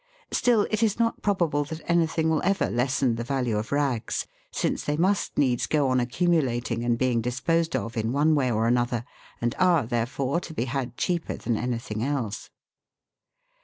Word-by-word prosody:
Still 235 -4 +3
it 215 0 0
is 220 -3 +2
not 230 0 0
probable 170 -7 +1
that 160 +2 -8
anything 165 -1 +2
will 160 -1 +2
ever 195 +1 +1
lessen 125 0 +1
the 115 - -3
value 125 -3 -1
of 105 +1 -3
rags, 135 -6 0 0.2
since - - -1
they 150 0 -1
must 190 +4 +1
needs 130 -4 +2
go 145 -3 +2
on 130 0 +2
accumulating 125 -3 0
and 120 -1 +1
being 125 -2 +1
disposed 160 +7 0
of 115 -2 -3
in 110 0 -1
one 150 +4 +3
way 135 -4 +2
or 110 0 +1
another, 120 0 +1 0.3
and 120 0 0
are, 175 -7 +4
therefore, 125 +6 -1
to 175 -3 -9
be 115 - -1
had 130 -2 -3
cheaper 175 -2 -1
than 120 - -1
any 120 +2 -1
thing 110 -2 -5
else. 130 -7 -3
130 Hz, 180 wpm, -26 LUFS, 120-160 Hz, 0.3 s, are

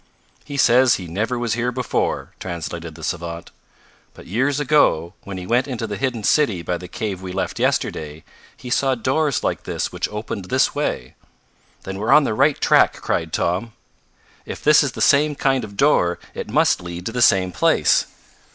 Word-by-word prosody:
"He 140 - -7
says 125 -1 +5
he 90 - -6
never 110 +9 -2
was 120 -2 -1
here 120 +1 -1
before," 125 -1 -2
translated 85 -2 -6
the 80 - -12
savant, 85 0 -5 0.6
"but - - -13
years 135 +9 0
ago, 125 - +2
when 100 -1 -6
he 90 - -6
went 120 +6 +1
into 125 -4 -4
the 105 -2 -4
hidden 125 -2 -2
city 105 - +2
by 90 +1 -2
the 90 - -9
cave 95 0 -4
we 95 -1 -6
left 95 +1 -3
yesterday, 75 0 -1 0.3
he 125 - -9
saw 135 0 +2
doors 135 +5 0
like - - -1
this - - -3
which - - -3
opened 105 -2 -5
this - - +1
way." 65 0 -3 0.7
"Then 95 0 -6
we're 110 +3 0
on 150 - +7
the 120 - -1
right - - +2
track!" - - +4
cried 80 -1 -2
Tom. 95 +9 -1 0.7
"If - - -8
this 150 0 +6
is 140 -4 -1
the - - -6
same 150 +1 +4
kind 135 -2 +1
of 100 -1 -9
door, 90 -12 +3 0.2
it - - -6
must - - +2
lead 90 0 -7
to - - -3
the 125 +1 -2
same 95 -5 +4
place. 80 - +2
110 Hz, 190 wpm, -21 LUFS, 90-130 Hz, 0.7 s, on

